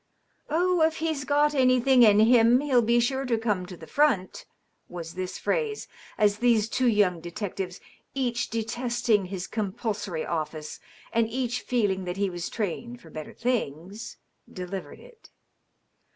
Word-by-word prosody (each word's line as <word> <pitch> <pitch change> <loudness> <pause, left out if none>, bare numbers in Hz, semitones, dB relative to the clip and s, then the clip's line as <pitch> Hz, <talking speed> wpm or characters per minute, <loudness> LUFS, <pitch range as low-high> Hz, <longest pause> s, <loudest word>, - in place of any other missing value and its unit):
Oh, 350 +3 +2
if 320 0 +3
he's 315 -4 -2
got 295 +1 +3
anything 255 -1 +4
in 210 -3 +7
him 235 +1 +6
he'll 265 -4 +3
be 235 +1 +3
sure 265 +3 0
to 245 -3 0
come 210 -5 -1
to 180 - -9
the 160 - -11
front," 250 - +1 0.4
was 170 -2 -7
this 185 0 -4
phrase, 445 -3 -1 0.3
as 210 -1 +2
these 230 -3 +3
two 250 +2 0
young 205 -6 +3
detectives 180 +1 -5 0.4
(each 250 -2 -1
detesting 230 -2 0
his 185 -1 -5
compulsory 205 -4 -3
office 155 -2 -4 0.3
and 230 -1 +2
each 245 0 -2
feeling 200 -6 0
that 180 +1 -4
he 200 -1 0
was 175 -1 -5
trained 235 +4 -4
for - - -16
better 155 -1 -8
things) 210 - -3 0.3
delivered 185 +1 -6
it. 485 -2 -17
225 Hz, 150 wpm, -26 LUFS, 185-255 Hz, 0.4 s, in